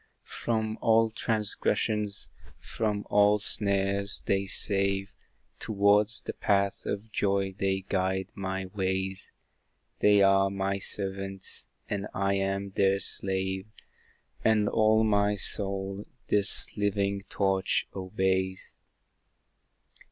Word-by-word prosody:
From 110 -2 -1
all 115 0 +4
transgressions, 105 -1 0 0.3
from 105 -2 -2
all 105 0 +5
snares, 100 -1 +1
they 95 0 +1
save, 100 0 0 0.5
Towards 105 +1 +3
the - - -5
Path 100 -1 0
of 105 +2 -4
Joy 100 -2 0
they 95 0 0
guide 95 0 0
my 95 -1 -3
ways; 95 0 -3 0.7
They 105 -1 +5
are 95 0 +4
my 95 0 -1
servants, 95 -1 -4 0.2
and 100 0 -3
I 100 0 +1
am 100 0 -1
their 95 0 +3
slave; 95 0 -3 0.8
And 110 -2 +3
all 110 +1 +4
my 105 -1 +2
soul, 100 0 -4 0.2
this 105 0 -1
living 100 -1 0
torch 95 -1 +1
obeys. 95 0 -1
100 Hz, 100 wpm, -28 LUFS, 95-105 Hz, 0.8 s, all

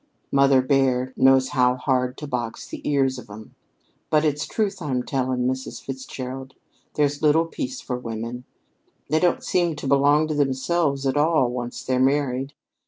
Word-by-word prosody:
Mother 135 -1 +4
bear 130 -1 +1
knows 130 0 +4
how 125 -3 +3
hard 125 -1 0
to 150 - -6
box 120 -5 -4
the - - -8
ears 135 -3 +1
of 125 - -13
'em. 105 +1 -11 0.6
But 155 0 +3
it's 145 -1 0
truth 200 -4 -2
I'm 130 -5 -2
saying, 130 -2 -1
Mrs. 130 0 -3
Fitzgerald; 130 0 -7 0.4
there's 145 -1 +1
little 155 +2 +4
peace 260 - -5
for 125 -2 -4
women. 115 +1 -5 0.7
They 155 +2 +3
don't 175 0 +1
seem 175 -3 +1
to 150 - -8
belong 145 +3 +4
to - - 0
themselves 140 +1 0
at 135 +1 +1
all, 150 -5 +3
once 120 -1 -5
they're 130 -1 0
married. 135 0 +1
135 Hz, 165 wpm, -23 LUFS, 125-150 Hz, 0.7 s, Mother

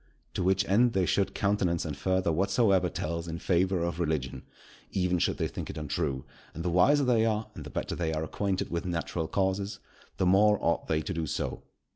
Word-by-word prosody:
To - - -2
which 95 +2 +2
end 115 +5 +4
they 95 -1 +2
should 100 +3 +1
countenance 100 -5 +1
and 75 -3 -3
further 95 +4 +1
whatsoever 95 +1 +2
tells 85 +1 -3
in 80 0 -4
favour 90 +1 +1
of 85 -1 -2
religion, 70 -6 -1 0.5
even 90 -2 0
should - - +1
they - - 0
think - - -6
it - - -6
untrue; 75 -3 -2 0.3
and 85 - -5
the 90 - +1
wiser 140 +12 +4
they 120 -4 +3
are, 110 -1 0
and - - -8
the - - -8
better - - -3
they 85 -2 -1
are 80 0 -2
acquainted 95 +3 -2
with 85 0 -1
natural 85 -2 -2
causes, 95 +3 -1 0.4
the 95 - +1
more 105 +3 +5
ought 85 - 0
they 80 0 +1
to - - -3
do 80 -2 -2
so. - - -3
90 Hz, 205 wpm, -29 LUFS, 85-100 Hz, 0.5 s, more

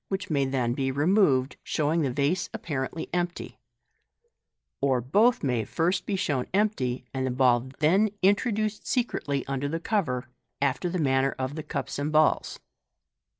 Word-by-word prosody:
which 190 -3 -4
may 140 -2 +2
then 130 -3 0
be 135 +1 -1
removed, 145 -2 +2
showing 155 +2 0
the 140 - +1
vase 145 +7 0
apparently 150 +1 -4
empty 175 0 -2
j - - -23 1.2
or 135 -2 +2
both 205 - +3
may 125 -4 +1
be - - -5
first 175 - -1
shown 140 -8 -1
empty, 135 - 0
and 130 -1 -1
the - - 0
ball 125 0 +2
then 190 +8 +3
introduced 210 +1 +1
secretly 145 - -1
under 135 +1 -2
the 165 +2 -2
cover, 165 - -1 0.3
after 140 +5 0
the 180 - -2
manner 135 -3 +1
of 130 +1 -3
the 155 - -5
cups 150 - -4
and 145 +2 -1
balls. 155 0 +2
145 Hz, 155 wpm, -27 LUFS, 130-180 Hz, 1.2 s, both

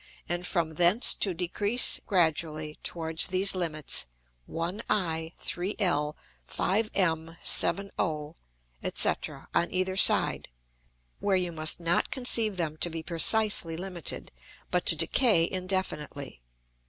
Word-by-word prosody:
and 175 +1 -3
from 165 -4 -2
thence 175 +8 +4
to 195 - 0
decrease 205 +7 +2
gradually 155 -4 -1
towards 160 0 +2
these 190 +2 +3
limits, 155 - -2 0.4
1I, 165 -2 -3
3L, 175 -5 -1 0.3
5M, 180 -5 -1
7O, 160 -6 0 0.6
&c. - - +4 0.4
on 170 - 0
either 185 0 -1
side; - - +3 0.7
where 200 -1 +1
you 180 -1 -2
must 155 0 +2
not 170 0 +1
conceive 230 -6 +2
them 160 -3 -3
to 175 - 0
be 165 -1 -6
precisely 170 0 +2
limited, 180 -1 -2 0.4
but - - -1
to - - +5
decay 210 -10 +3
indefinitely. 180 - -4
175 Hz, 110 wpm, -27 LUFS, 160-195 Hz, 0.7 s, to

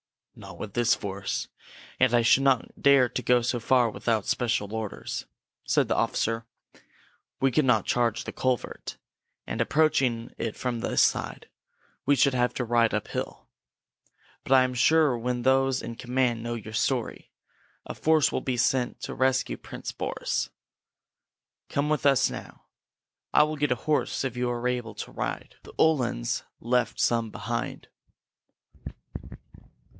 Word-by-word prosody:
"Not - - -11
with 100 - -7
this 120 -1 +3
force. 100 -1 -4 0.5
And 125 -2 +4
I 120 - +4
should 120 +3 +5
not 135 -3 +1
dare 140 -3 +6
to - - -3
go 125 -1 +3
so 120 +1 0
far 120 -1 +3
without 105 +1 -1
special 110 -4 -1
orders," 110 -2 -5 0.4
said - - +2
the - - 0
officer. 115 0 0 0.9
"We 135 0 +2
could 150 +3 +2
not 110 -5 +3
charge 120 -2 +1
the - - -6
culvert, 130 -2 -3 0.5
and, 110 - -3
approaching 125 -4 +1
it 115 -2 -3
from 125 -2 -3
this - - +2
side, - - -1 0.6
we 145 - +5
should 135 +1 +3
have 125 -1 +1
to 125 - -2
ride 115 -1 +2
uphill. 105 - -4 0.9
But 135 - 0
I 130 -1 +7
am 130 0 -1
sure 155 +4 +4
that - - -5
when 125 -1 -1
those 135 0 +2
in 115 - -5
command 125 -1 0
know 120 +1 -3
your 110 -1 -8
story, 120 +2 -1 0.6
a - - -6
force 155 -4 +3
will - - -1
be 130 -2 -2
sent 120 +1 +1
to - - -5
rescue 130 0 +1
Prince - - -7
Boris. - - -2 1.2
Come 145 +1 0
with 150 -2 +2
us 135 -1 +4
now. - - -9 0.7
I - - +6
will 155 0 -2
get 145 0 +1
you 125 - +2
a - - -16
horse 155 -2 0
if 130 -3 -3
you 125 0 -1
are 120 0 -2
able 120 -4 -3
to - - -7
ride. - - -5
The - - -14
Uhlans 125 - +1 0.2
left 120 +1 0
some 115 -2 +1
behind!" 115 +2 -5
125 Hz, 160 wpm, -27 LUFS, 115-130 Hz, 1.2 s, I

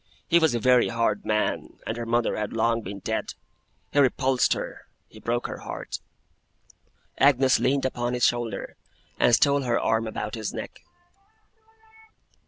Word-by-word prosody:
He 170 - +5
was 160 -7 +2
a - - 0
very 125 +1 +4
hard 115 -3 -1
man, 105 0 -1
and 110 - -3
her 120 0 -5
mother 120 0 +1
had 105 -1 -3
long 115 +1 +1
been 100 -1 -7
dead. - - -3 0.6
He 145 - +3
repulsed 130 -1 +3
her. - - -7 0.2
He - - -15
broke 120 +1 -2
her - - -5
heart.' - - -6 1.2
Agnes 135 -1 +4
leaned 135 +1 +1
upon 120 -1 -1
his 125 - +2
shoulder, 120 -2 -2 0.4
and 120 - +5
stole 140 +2 +3
her 120 -3 0
arm 115 0 +1
about 105 -1 -4
his 110 -2 -4
neck. - - -7
120 Hz, 155 wpm, -25 LUFS, 115-130 Hz, 1.2 s, He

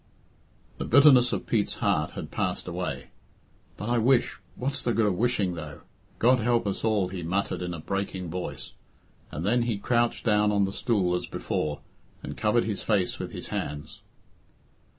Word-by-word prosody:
The - - -3
bitterness 130 -2 +6
of - - -2
Pete's 105 -3 0
heart - - 0
had - - -7
passed - - -2
away. - - -4 0.7
"But 105 - -5
I 120 0 +2
wish 125 +2 +2 0.2
what's 135 +2 -2
the 120 - 0
good 115 - +3
of 105 - +2
wishing, 110 -4 +1
though? 75 -4 -8 0.4
God 125 +2 +4
help 120 0 +2
us 100 - -2
all," 105 -5 +2
he 95 -1 -5
muttered, 95 +4 -1
in 90 -1 -3
a - - -7
breaking 95 -1 -3
voice, 90 +1 -5 0.6
and 80 - -4
then 120 +4 +3
he 115 -3 0
crouched 120 +3 0
down 105 -2 +3
on 100 -1 +3
the 95 - -4
stool 95 -7 +1
as 90 - -3
before 75 -1 -3 0.4
and - - -6
covered 110 +2 +2
his 105 -3 -3
face 100 -5 0
with - - -5
his - - -7
hands.. 75 +1 -5
105 Hz, 175 wpm, -27 LUFS, 90-120 Hz, 0.7 s, bitterness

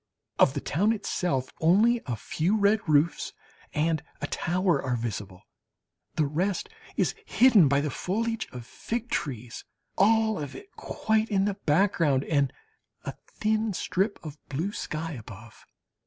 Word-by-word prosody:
Of 135 - +5
the 140 - -2
town 205 +9 +2
itself 175 - -2
only 215 +9 +4
a 120 - -1
few 165 - 0
red 205 +1 +4
roofs 150 +1 +2 0.4
and 155 0 +1 0.2
a - - -2
tower 175 -3 +1
are 130 -2 -1
visible, 105 -5 -5 0.7
the 155 - +2
rest 175 +7 -1 0.3
is - - +2
hidden 230 - +6
by 140 +1 +3
the 150 -1 -2
foliage 225 - -2
of 125 -3 -8
fig 235 - -5
trees, 125 -4 -3 0.4
all 220 0 +4
of 145 -2 -6
it 400 - -11
quite 220 0 0
in 195 -2 +2
the 205 - +1
background, 165 -6 +2
and 140 -4 +1 0.5
a - - -3
thin 215 0 0
strip 195 +3 0
of 150 -1 -8
blue 160 +9 -2
sky 165 -4 -4
above. 115 -4 -11
165 Hz, 145 wpm, -27 LUFS, 140-210 Hz, 0.7 s, hidden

